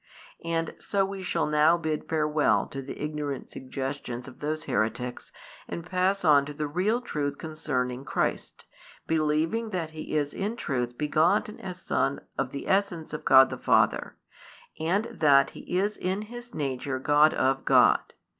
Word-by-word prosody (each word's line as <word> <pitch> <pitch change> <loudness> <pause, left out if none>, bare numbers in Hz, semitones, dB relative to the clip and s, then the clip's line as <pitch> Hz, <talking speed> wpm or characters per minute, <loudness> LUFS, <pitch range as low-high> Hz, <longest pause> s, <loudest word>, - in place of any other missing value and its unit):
And 165 -1 -1
so 195 -1 0
we 195 0 -6
shall 175 -2 0
now 150 +3 +4
bid 155 -2 -3
farewell 150 -1 +2
to 135 - -5
the 135 - -8
ignorant 150 -3 -4
suggestions 130 -2 -5
of 130 - -12
those 155 +1 -2
heretics 115 +3 -2 0.4
and 170 - -6
pass 185 +1 0
on 145 -3 +6
to 150 - -7
the 150 0 -2
real 190 +11 0
truth 145 - -3
concerning 135 -5 -3
Christ, - - -2 0.4
believing 160 +8 0
that 170 -6 -3
He 155 -1 -4
is 145 -1 -1
in 210 +4 -2
truth 125 - -3
begotten 165 +8 +1
as 185 -1 -7
Son 135 - 0 0.2
of 135 -1 -1
the 140 - -6
essence 190 -6 0
of 150 - -5
God 135 -1 +7
the - - -5
Father, - - +2 0.6
and 180 +7 +1
that 145 - +4
He 180 - -4
is 205 +3 0
in 190 +3 -2
His 240 +2 -10
nature 135 -2 -2
God 145 +3 +4
of 135 +1 +1
God. - - +5
155 Hz, 160 wpm, -27 LUFS, 140-180 Hz, 0.6 s, God